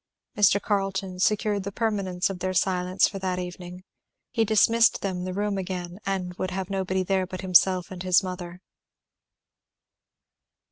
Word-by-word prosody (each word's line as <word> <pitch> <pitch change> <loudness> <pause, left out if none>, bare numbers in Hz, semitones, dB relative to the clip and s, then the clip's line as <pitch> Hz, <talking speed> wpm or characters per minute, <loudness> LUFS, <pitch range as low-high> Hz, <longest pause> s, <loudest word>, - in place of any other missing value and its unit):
Mr. 205 -1 +4
Carleton 195 -2 -2
secured 210 +1 +1
the 200 +1 -5
permanence 195 -4 -1
of 185 - -7
their 185 0 -2
silence 180 +1 +2
for 195 - -6
that 185 -1 -2
evening. 180 0 -7 0.5
He 225 - +2
dismissed 225 +2 +4
them 185 -2 -2
the 185 - -3
room 205 -1 -1
again 180 0 -5
and 185 -2 -2
would 185 - -1
have 190 +1 -4
nobody 190 -1 -1
there 190 0 0
but 185 0 -6
himself 185 0 +3
and 185 -1 -7
his 185 +1 +3
mother. 180 -1 -6
185 Hz, 150 wpm, -26 LUFS, 180-200 Hz, 0.5 s, Mr